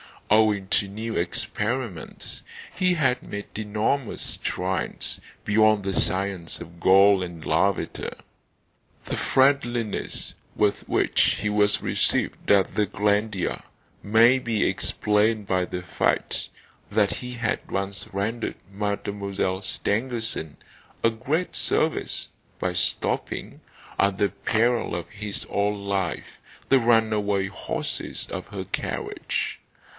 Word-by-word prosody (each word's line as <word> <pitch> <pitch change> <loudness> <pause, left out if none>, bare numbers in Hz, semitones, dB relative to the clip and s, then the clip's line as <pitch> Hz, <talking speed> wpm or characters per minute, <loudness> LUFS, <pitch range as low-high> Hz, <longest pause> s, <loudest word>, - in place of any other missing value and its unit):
Owing 105 -3 +4
to 100 - +2
new 110 +3 -5
experiments, 105 - -2 0.3
he 185 -1 +2
had 130 -5 +2
made 100 0 -7
enormous 110 +4 -1
strides - - 0 0.2
beyond 110 -1 +4
the 95 0 -1
science 95 -3 0
of 85 +1 -11
Gall 95 +2 +6
and 85 -3 -6
Lavater. 90 +4 0 0.9
The - - -3
friendliness 120 -5 +1 0.2
with 105 -1 +1
which - - +3
he 105 - 0
was 105 0 +3
received - - 0
at 100 -2 +4
the 105 - +3
Glandier 105 -1 0 0.4
may 115 +5 +5
be 115 -4 0
explained 105 0 +2
by 90 -1 +1
the 90 0 -5
fact 90 - 0 0.4
that 105 -1 +2
he 125 0 -6
had 120 -3 -2
once 100 0 -3
rendered 110 +4 -2 0.2
Mademoiselle 100 -2 -2
Stangerson 110 - 0 0.5
a 115 - +5
great 150 +10 -2
service - - 0 0.3
by - - -1
stopping, - - -1 0.4
at 100 -1 +3
the 100 0 +2
peril 115 -3 +1
of 85 -1 -5
his 105 -1 -3
own 100 0 0
life, 95 -4 -2 0.3
the 135 - +6
runaway 110 -4 +2
horses 100 - -3
of - - -5
her - - -5
carriage. - - -3
105 Hz, 115 wpm, -25 LUFS, 100-115 Hz, 0.9 s, Gall